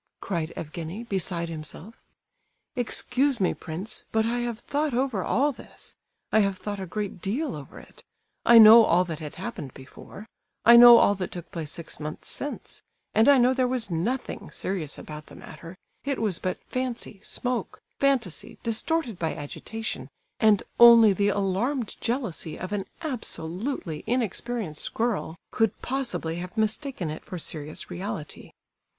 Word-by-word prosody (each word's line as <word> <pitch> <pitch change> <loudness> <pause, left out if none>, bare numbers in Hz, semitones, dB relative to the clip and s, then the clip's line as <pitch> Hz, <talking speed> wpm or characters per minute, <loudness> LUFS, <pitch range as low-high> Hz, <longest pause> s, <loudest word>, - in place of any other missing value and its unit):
cried 170 -5 -3
Evgenie, 165 +6 -6
beside 185 -6 -2
himself: 165 +6 -7 0.8
"Excuse 255 +2 +1
me, 185 - +2
prince, 180 +7 -5
but 220 0 +2
I 240 +2 0
have 240 -2 -2
thought 290 +3 -2
over 250 -7 0
all 285 +4 +2
this; 255 - -12 0.4
I 220 - +5
have 200 -2 +1
thought 205 +1 -5
a 190 - -5
great 200 -1 -4
deal 260 +9 -2
over 140 -3 -10
it; - - -15 0.4
I 235 - +7
know 225 +1 +10
all 180 -2 +3
that 160 -3 -5
had 150 -2 -7
happened 185 - -6
before; 140 +9 -12 0.4
I 235 +2 +9
know 240 0 +11
all 200 - +5
that 190 -2 -4
took 175 -1 -8
place 160 -3 -5
six 165 +1 -7
months 150 0 -5
since; 290 - -5 0.3
and 220 +5 +5
I 280 - +7
know 250 +1 +4
there 255 -1 +1
was 245 -5 -1
nothing 220 +11 -3
serious 170 -7 -3
about 150 0 -9
the - - -13
matter, 170 +2 -11 0.3
it 275 -1 -2
was 210 -6 -1
but 185 -1 -2
fancy, 250 -5 -4
smoke, 245 0 -3 0.2
fantasy, 255 - 0
distorted 230 - -1
by 160 -1 -1
agitation, 220 +9 -5 0.3
and 215 -3 +4 0.2
only 235 -3 +9
the 200 +2 +1
alarmed 205 +6 -1
jealousy 225 - -3
of 185 +2 -6
an 200 -2 -2 0.2
absolutely 190 - -4
inexperienced 230 -6 -3
girl 225 -8 -1 0.2
could 225 -3 +1
possibly 185 -11 -1
have 180 +4 -7
mistaken 220 - -1
it 155 - -7
for 180 - -7
serious 155 -2 -5
reality." 185 -4 -6
210 Hz, 155 wpm, -26 LUFS, 170-240 Hz, 0.8 s, know